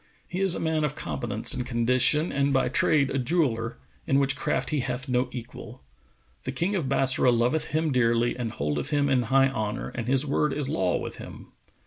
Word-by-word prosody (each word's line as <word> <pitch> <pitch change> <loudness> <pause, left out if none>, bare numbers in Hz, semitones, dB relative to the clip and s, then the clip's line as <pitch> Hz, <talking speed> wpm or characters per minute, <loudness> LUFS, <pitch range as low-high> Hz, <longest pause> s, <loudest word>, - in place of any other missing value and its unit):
He 180 +2 -4
is 190 -3 +4
a - - -4
man 160 -1 0
of 150 -1 -1
competence 110 -4 -2
and 125 - -2
condition 125 +6 +3
and 140 0 0
by 135 -1 +1
trade 140 -3 +2
a 135 - -1
jeweller, 125 -6 -1 0.3
in 135 - +2
which 140 0 +2
craft 135 0 -2
he 150 - 0
hath 125 +1 -3
no 125 0 0
equal. 120 0 -9 0.6
The 130 - -4
King 170 +9 -1
of 155 -9 -2
Bassorah 130 -2 +3
loveth 120 +6 +1
him 155 0 -1
dearly 120 -1 +1
and 120 -3 -4
holdeth 75 -3 -3
him 145 -1 +1
in 130 -2 +2
high 135 0 +4
honour 110 -5 -4
and 120 -1 -6
his 135 +2 +2
word 150 0 0
is 145 -2 -2
law 90 -8 0
with - - -6
him." - - -11
130 Hz, 200 wpm, -26 LUFS, 120-145 Hz, 0.6 s, is